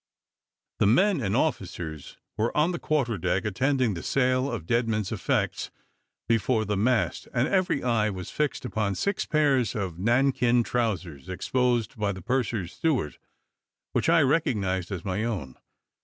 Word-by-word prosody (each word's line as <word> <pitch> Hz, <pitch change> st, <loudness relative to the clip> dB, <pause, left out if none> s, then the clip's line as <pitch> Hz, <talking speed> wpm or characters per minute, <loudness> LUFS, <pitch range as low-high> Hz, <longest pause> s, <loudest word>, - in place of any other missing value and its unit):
The 105 Hz, -, +4 dB
men 160 Hz, -, +4 dB
and 100 Hz, -2 st, 0 dB
officers 90 Hz, -, -3 dB, 0.2 s
were 110 Hz, +6 st, -1 dB
on 155 Hz, +4 st, +3 dB
the 170 Hz, -, -4 dB
quarter 125 Hz, -9 st, 0 dB
deck, 95 Hz, +5 st, 0 dB
attending 125 Hz, +2 st, +1 dB
the 85 Hz, -, -5 dB
sale 130 Hz, 0 st, +1 dB
of 80 Hz, -, -4 dB
dead 115 Hz, +6 st, +1 dB
men's 105 Hz, -3 st, -1 dB
effects -, -, -1 dB, 0.6 s
before 115 Hz, 0 st, +2 dB
the 105 Hz, 0 st, -1 dB
mast, 115 Hz, +4 st, +1 dB
and 125 Hz, +3 st, +2 dB
every 185 Hz, -7 st, +1 dB
eye 115 Hz, -3 st, +2 dB
was 95 Hz, -3 st, -6 dB
fixed 150 Hz, -4 st, -1 dB
upon 105 Hz, -5 st, -1 dB
six 200 Hz, -, -1 dB
pairs 140 Hz, -, +2 dB
of 95 Hz, -5 st, -3 dB
nankeen 120 Hz, +2 st, +3 dB
trowsers 95 Hz, -, -2 dB
exposed 120 Hz, +4 st, 0 dB
by 105 Hz, -2 st, +1 dB
the 95 Hz, -, -9 dB
purser's 120 Hz, -7 st, -1 dB
steward, 135 Hz, -, -1 dB, 0.7 s
which -, -, +1 dB
I 165 Hz, 0 st, +6 dB
recognised 105 Hz, -, 0 dB
as 90 Hz, -4 st, -5 dB
my 100 Hz, +2 st, -1 dB
own. 95 Hz, -, -3 dB
115 Hz, 155 wpm, -26 LUFS, 95-130 Hz, 0.7 s, I